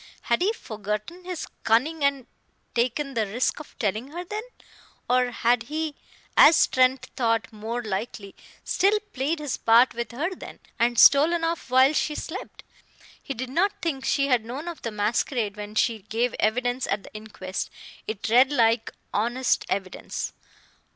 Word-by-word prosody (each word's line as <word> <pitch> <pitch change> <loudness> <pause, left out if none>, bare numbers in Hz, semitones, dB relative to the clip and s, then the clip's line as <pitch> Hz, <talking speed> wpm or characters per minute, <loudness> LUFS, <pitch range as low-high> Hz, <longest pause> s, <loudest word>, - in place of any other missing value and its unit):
Had 235 - +1
he 390 +4 +3
forgotten 215 - -5
his 360 -3 -4 0.2
cunning 285 +8 +2
and 280 -3 +1 0.5
taken 255 +4 0
the 220 -4 0
risk 240 +9 -1
of 300 - -12
telling 215 +3 -1
her 345 +5 -7
then? 420 +4 -4 0.7
Or 250 0 +3
had 240 0 +2
he, 310 0 -2 0.4
as 320 - +7
Trent 260 0 +2
thought 230 -2 0
more 225 +3 -4
likely, 200 -1 -4 0.3
still 405 +3 +2
played 280 +6 -1
his 295 -4 -3
part 230 +3 +5
with 235 -2 -4
her 315 +10 -2
then, - - -10 0.2
and 240 +1 +2
stolen 320 +7 +6
off 330 -4 -2
while 260 +3 +5
she 300 0 0
slept? 335 +5 -7 0.6
He 275 - -5
did 255 +2 -5
not 390 +8 +2
think 300 -6 -2
she 275 +1 +2
had 250 -5 +2
known 260 +8 -6
of 340 -2 -6
the 230 - -3
masquerade 215 +1 -1
when 210 0 -8
she 225 0 +2
gave 225 +4 -1
evidence 245 +3 0
at 195 0 -1
the - - -14
inquest; 210 -3 -5 0.4
it 215 -1 -4
read 250 +5 +5
like 230 -4 +2 0.2
honest 240 +5 0
evidence. 190 -1 -4
245 Hz, 160 wpm, -25 LUFS, 220-295 Hz, 0.7 s, as